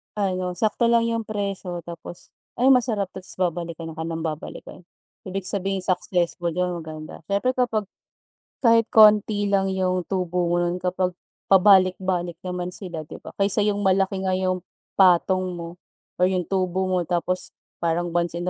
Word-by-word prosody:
ano, 185 -3 -1
sakto 220 +5 +1
lang 235 0 +4
yung 230 -1 -2
presyo 195 -4 -4
tapos, 170 0 -10 0.2
"Ay, 260 +3 +4
masarap 225 -6 +2
'to," - - -8
tapos 185 - -5
babalikan 170 -2 -3
ka 160 0 -6
ng 165 0 -4
babalikan. 160 +3 -6 0.4
Ibig 190 0 -4
sabihin 195 -1 -1
successful 175 -2 0
yun, 180 -1 -1
maganda. 155 -1 -9
Siyempre 200 +6 +1
kapag 245 -4 0 0.8
kahit 230 -2 +4
konti 210 -1 +5
lang 195 -1 +1
yung 185 -1 0
tubo 180 -2 -1
mo - - +2
nun 175 0 0
kapag 180 0 -1 0.3
pabalik-balik 185 -2 +4
naman 180 0 -4
sila, 170 -6 -6
di - - -9
ba? - - -9
Kaysa 200 +1 +3
yung 205 -1 +1
malaki 190 0 +2
nga 185 -1 +1
yung 185 -1 0 0.4
patong 185 0 +4
mo 170 +1 -8 0.4
or 180 - +5
yung 180 -1 0
tubo 185 -1 0
mo 185 -1 +1
tapos 180 +1 -1 0.3
parang 170 +1 0
once 170 -1 0
in 175 - -3
185 Hz, 160 wpm, -24 LUFS, 175-200 Hz, 0.8 s, konti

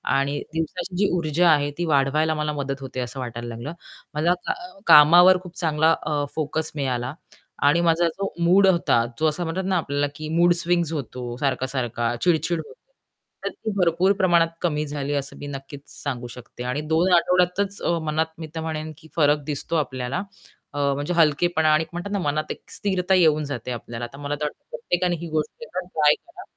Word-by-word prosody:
आणि 140 +1 0
दिवसाची 175 +3 -3
जी 205 +2 +3
ऊर्जा 170 +1 +2
आहे, 145 -2 +3
ती 175 - -1
वाढवायला 155 +1 +2
मला 150 0 -2
मदत 140 -1 -4
होते, 130 -1 -6
असं 125 +1 -4
वाटायला 120 -1 -5
लागलं. 120 +7 -6 0.4
मला 160 +4 +2
का - - 0 0.3
कामावर 175 +5 +8
खूप 180 -1 -11
चांगला 160 -1 +2
अ, 150 -1 -1
फोकस 160 +1 -2
मिळाला 130 -2 -2 0.5
आणि 170 +4 +4
माझा 170 0 +3
जो 195 +4 -4
मूड 190 +3 +5
होता, 170 -10 +3
जो 160 - +3
असा 155 +3 -1
म्हणतात 170 +3 -2
ना, 190 0 +1
आपल्याला 145 -3 0
की 155 0 -6
मूड 175 0 +6
स्विंग्स 170 -2 +1
होतो, 125 -4 -5
सारखा-सारखा 130 -3 -1
चिड-चिड 170 -1 +2
होते, - - -13 0.7
तर - - +1
ती 220 - -5
भरपूर 180 +1 +3
प्रमाणात 175 -4 +3
कमी 150 -3 0
झाली, 145 0 -3
असं 140 -1 -3
मी 145 - -7
नक्कीच 140 0 -8 0.2
सांगू 125 -4 -3
शकते. 120 0 -10
आणि 125 +4 -2
2 175 +4 +3
आठवड्यातच, 180 +3 +1
अ, 170 - +1
मनात 155 +1 0
मी 160 - -6
तर 160 - -3
म्हणेन 155 -1 -4
की, 155 - -16
फरक 150 -2 +3
दिसतो 150 +2 -3
आपल्याला. 130 -3 -2 0.5
अ, - - -7 0.2
म्हणजे 145 +5 -2
हलकेपणा 160 0 +3
आणि 155 +1 +3
एक 160 - -13
म्हणतात 175 +4 -5
ना, 200 - 0
मनात 155 -2 -1
एक - - -7
स्थिरता 190 -2 0
येऊन 155 -4 +4
जाते 125 -3 -5
आपल्याला. 120 0 -5
तर - - -10
मला 145 0 -3
तर 150 - -6
वाटतं, 150 - -7
प्रत्येकाने 180 - -1
ही 170 - -5
गोष्ट 155 +5 -3
एकदा 185 -5 -5
ना - - -18
ट्राय 150 -1 +5
करा. 350 +1 -14
155 Hz, 190 wpm, -23 LUFS, 140-175 Hz, 0.7 s, कामावर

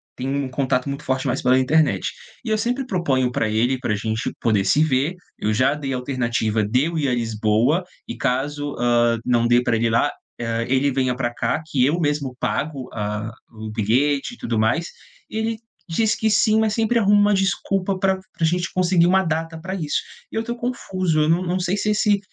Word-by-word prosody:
tem 130 - -4
um 140 -1 -1
contato 130 0 0
muito 140 +2 -5
forte 130 0 -1
mais - - -1
pela 130 +1 +4
internet. 150 +4 +2 0.3
E - - -3
eu 215 - +2
sempre 245 +4 -1
proponho 135 - 0
pra 110 - 0
ele 120 +4 +1
pra 105 -4 -1
gente 110 +2 -2
poder 105 -4 +2
se 150 +9 +4
ver, 150 +4 +1 0.2
eu 110 0 0
já 130 +5 +3
dei 140 -3 -4
alternativa 120 -4 -1
de 125 +7 +2
eu 165 - -4
ir 140 - 0
à 125 - +1
Lisboa 115 - +1 0.2
e 115 - -6
caso, 145 +4 -1
hã, 120 -1 +3
não 120 -1 +2
dê 120 +1 +4
pra 120 -2 +1
ele 115 - 0
ir - - +1
lá, 115 - +2 0.3
hã, 115 0 -1
ele 135 +2 +2
venha 130 -1 0
pra 120 -2 -2
cá 120 +8 -1
que 130 -5 +1
eu 155 +5 +1
mesmo 145 -4 -1
pago 140 -4 -2
a 105 +1 -3 0.2
o 110 -1 -8
bilhete 135 - +1
e - - -24
tudo 115 -2 -2
mais. 120 +10 +1 0.4
E 220 - -5
ele 220 0 -1 0.3
diz 210 +5 +1
que 220 - 0
sim, 215 +1 +3
mas 220 -1 +1
sempre 230 +1 +2
arruma 205 0 +4
uma 205 0 +4
desculpa 195 0 0
pra 190 0 +2
pra - - -14 0.2
a - - +4
gente 175 +2 0
conseguir 180 -1 +3
uma 190 +1 +4
data 165 0 -2
pra 190 +3 -5
isso. 155 -5 -1 0.3
E - - -9
eu 225 - 0
tô 235 +1 -3
confuso, 185 -9 -1
eu 155 - +2
não 175 +3 +2
não 180 +1 -1
sei 180 +3 0
se 210 +1 0
esse 210 -1 +2
140 Hz, 220 wpm, -22 LUFS, 120-185 Hz, 0.4 s, pela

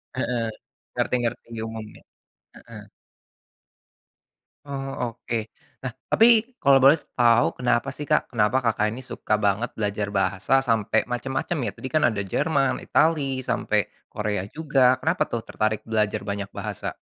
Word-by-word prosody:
Heeh, 115 -2 -1 0.5
ngerti - - 0
ngerti 115 0 -3 0.2
umumnya, 110 -1 -8 0.5
heeh. - - -13 1.8
Oh, 135 -4 -4
oke, 115 - -4 0.5
nah 130 - -3 0.2
tapi 235 +2 +4
kalau 135 -1 +6
boleh 135 +4 +7 0.2
tahu 120 0 +5
kenapa 120 -1 +1
sih, 145 -2 -7
Kak, - - +1
kenapa 120 +3 +2
Kakak 110 -2 +1
ini 130 - -8
suka 110 - -1
banget 105 +3 0
belajar 105 -1 -1
bahasa 100 +6 +1
sampai 110 -2 +1
macam-macam 135 +6 -3
ya, - - -2
tadi 130 - -6
kan 155 -1 +2
ada 105 -4 -1
Jerman, 135 - 0
Itali, 140 -5 +1
sampai - - 0 0.3
Korea 105 -2 -3
juga 135 -5 +3
kenapa 165 +3 +1
tuh 115 -1 -3
tertarik 110 -1 -1
belajar 110 -1 0
banyak 100 -1 -3
bahasa? - - -4
120 Hz, 135 wpm, -24 LUFS, 105-135 Hz, 1.8 s, boleh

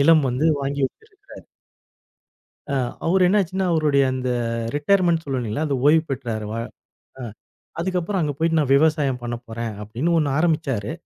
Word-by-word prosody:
நிலம் 155 0 +5
வந்து 125 +5 -1 0.2
வாங்கி 140 +1 -2
வச்சிருக்குறாரு. 405 - -16 1.3
ஆ, - - +1 0.3
அவரு 185 +2 +3
என்ன 205 +3 +3
ஆச்சுன்னா, 190 +1 -2
அவருடைய 150 -4 +3
அந்த 130 -1 -3 0.5
ரிடையர்மென்ட்னு 170 +1 +2
சொல்லுவோம் 135 -3 -2
இல்லேங்களா! 115 +7 -2
அது 140 - 0
ஓய்வு 155 +1 +5
பெற்றாரு. 120 -5 -3
வ - - -4 0.7
அ - - -7 0.6
அதுக்கு 185 +1 0
அப்புறம் 190 +3 -2
அங்க 150 -2 -1
போயிட்டு 165 +1 +1
நான் 140 -3 0
விவசாயம் 145 -3 +2
பண்ணப்போறேன். 120 -1 -5
அப்பிடின்னு 125 +11 -1
1 150 -3 +1
ஆரம்பிச்சாரு. 155 - 0
150 Hz, 150 wpm, -22 LUFS, 130-165 Hz, 1.3 s, நிலம்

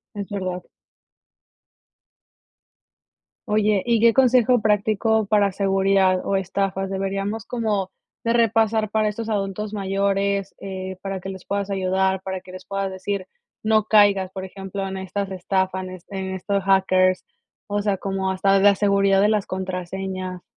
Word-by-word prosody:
Es 200 -1 -5
verdad. 185 -3 -4 2.9
Oye, 210 -1 +2
¿y 235 -2 +2
qué 230 0 +6
consejo 250 -1 +4
práctico 215 +1 +2
para 200 -1 +2
seguridad 195 -1 +2
o 200 - 0
estafas 195 0 -1
deberíamos 195 +2 -3
como 210 -6 -2 0.3
de 230 - +2
repasar 225 -2 +2
para 215 0 +2
estos 220 +2 -4
adultos 205 0 -2
mayores? 195 0 0
Eh, 190 -1 -6
para 195 -1 -4
que 190 - -6
les 190 -1 -8
puedas 200 0 -2
ayudar, 190 0 0
para 190 -1 -4
que 180 - -13
les 185 - -10
puedas 195 -1 -3
decir: 190 +1 -4 0.4
"No 215 -1 +3
caigas", 200 -3 +4
por 190 - -5
ejemplo, 195 +1 -6
en 190 0 -5
estas 190 +1 -4
estafan, 190 0 -1
este, 185 +2 -9
en 190 0 -4
estos 200 +2 -1
hackers, 185 -1 +3 0.4
o 205 0 -1
sea, 205 -1 +1
como 195 0 -2
hasta 190 +1 +1
de - - +1
la 200 -1 +7
seguridad 200 -1 +3
de 205 - +4
las 210 -2 +1
contraseñas. 185 0 -4
195 Hz, 150 wpm, -23 LUFS, 190-205 Hz, 2.9 s, la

